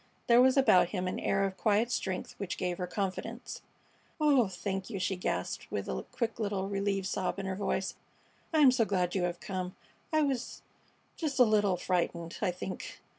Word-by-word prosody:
There 240 Hz, +1 st, +6 dB
was 260 Hz, +1 st, +5 dB
about 185 Hz, -10 st, +5 dB
him 185 Hz, -2 st, -2 dB
an 185 Hz, -, -2 dB
air 195 Hz, 0 st, +1 dB
of 190 Hz, -1 st, -4 dB
quiet 220 Hz, +2 st, +2 dB
strength 190 Hz, -5 st, -2 dB
which 190 Hz, -3 st, -3 dB
gave 180 Hz, -1 st, -2 dB
her 180 Hz, -, -2 dB
confidence. 205 Hz, +5 st, -4 dB, 0.6 s
"Oh, 280 Hz, -7 st, +4 dB
thank 190 Hz, +1 st, -4 dB
you!" 210 Hz, -, -4 dB
she 185 Hz, +1 st, 0 dB
gasped, 180 Hz, -, -3 dB
with -, -, -2 dB
a -, -, -3 dB
quick 230 Hz, -1 st, -2 dB
little 200 Hz, -3 st, -1 dB
relieved 195 Hz, -1 st, -1 dB
sob 190 Hz, 0 st, -1 dB
in 195 Hz, -, -4 dB
her 190 Hz, 0 st, -2 dB
voice. 195 Hz, -1 st, -1 dB, 0.6 s
"I 315 Hz, -2 st, +3 dB
am 270 Hz, -3 st, +8 dB
so 250 Hz, -2 st, +3 dB
glad 180 Hz, -4 st, 0 dB
you 190 Hz, -, 0 dB
have 175 Hz, 0 st, -3 dB
come. 185 Hz, +1 st, -4 dB, 0.4 s
I 310 Hz, -1 st, +3 dB
was 270 Hz, -4 st, -2 dB, 0.5 s
just 310 Hz, -4 st, -2 dB
a 255 Hz, -, +8 dB
little 205 Hz, -4 st, +3 dB
frightened, 170 Hz, -2 st, -1 dB
I -, -, +2 dB
think." 180 Hz, +1 st, -6 dB
195 Hz, 190 wpm, -31 LUFS, 185-230 Hz, 0.6 s, am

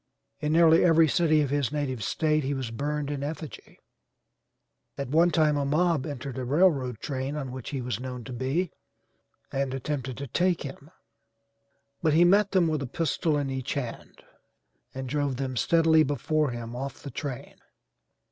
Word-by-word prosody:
In 150 Hz, 0 st, -1 dB
nearly 165 Hz, 0 st, +6 dB
every 165 Hz, -2 st, +5 dB
city 155 Hz, 0 st, +3 dB
of 140 Hz, -, -3 dB
his 145 Hz, -3 st, 0 dB
native 135 Hz, -6 st, -2 dB
State 155 Hz, +6 st, +1 dB
he 140 Hz, +2 st, -1 dB
was 130 Hz, -4 st, -4 dB
burned 145 Hz, +3 st, -2 dB
in 140 Hz, -2 st, -3 dB
effigy; 155 Hz, +1 st, -7 dB, 1.2 s
at 140 Hz, -2 st, -4 dB
one 165 Hz, +5 st, +4 dB
time 155 Hz, -3 st, +2 dB
a 145 Hz, -, 0 dB
mob 155 Hz, 0 st, +1 dB
entered 140 Hz, -2 st, -5 dB
a -, -, -3 dB
railroad 135 Hz, -, +2 dB
train 135 Hz, +2 st, -4 dB
on 135 Hz, -4 st, -4 dB
which 130 Hz, -2 st, -7 dB
he 135 Hz, -3 st, -3 dB
was 120 Hz, -3 st, -3 dB
known 125 Hz, -1 st, -6 dB
to 125 Hz, -, -8 dB
be 135 Hz, +8 st, -1 dB, 0.8 s
and 135 Hz, -1 st, -1 dB
attempted 130 Hz, -2 st, -4 dB
to 140 Hz, -, -5 dB
take 175 Hz, +7 st, 0 dB
him, 140 Hz, +1 st, -9 dB, 1.1 s
but 155 Hz, -3 st, +2 dB
he 170 Hz, +3 st, +6 dB
met 200 Hz, +3 st, +4 dB
them 185 Hz, -4 st, +3 dB
with 155 Hz, -2 st, -1 dB
a 140 Hz, -, -3 dB
pistol 160 Hz, +1 st, 0 dB
in 140 Hz, -2 st, -2 dB
each 130 Hz, -1 st, -3 dB
hand, 125 Hz, -5 st, -6 dB, 0.7 s
and 130 Hz, 0 st, -4 dB
drove 140 Hz, 0 st, -1 dB
them 130 Hz, 0 st, -3 dB
steadily 160 Hz, +6 st, +4 dB
before 150 Hz, +1 st, +1 dB
him 120 Hz, -1 st, -6 dB
off 135 Hz, +2 st, -6 dB
the 140 Hz, -, -7 dB
train. 135 Hz, -1 st, -6 dB
145 Hz, 175 wpm, -27 LUFS, 130-155 Hz, 1.2 s, nearly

